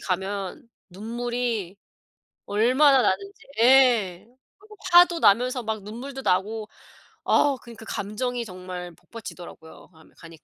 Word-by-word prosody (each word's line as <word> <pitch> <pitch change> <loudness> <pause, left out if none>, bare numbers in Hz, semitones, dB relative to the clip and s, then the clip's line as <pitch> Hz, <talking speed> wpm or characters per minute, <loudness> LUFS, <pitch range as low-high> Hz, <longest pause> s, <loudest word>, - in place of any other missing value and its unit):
가면 195 +3 -4 0.2
눈물이 230 -1 -4 0.7
얼마나 255 +6 +4
나는지 400 +9 -2 0.2
예. 235 -8 +4 0.3
그리고 425 +2 -17 0.2
화도 350 -1 +6
나면서 250 +3 +3
막 220 -2 -4
눈물도 255 +6 -8
나고 210 +3 0 0.6
아 285 -1 +3
그러니까 230 -2 -12
감정이 235 +5 -3
정말 180 -2 -8
복받치더라고요, 175 -4 -12
가면 160 0 -21
가니까. 165 -2 -14
220 Hz, 275 characters per minute, -24 LUFS, 190-255 Hz, 0.7 s, 화도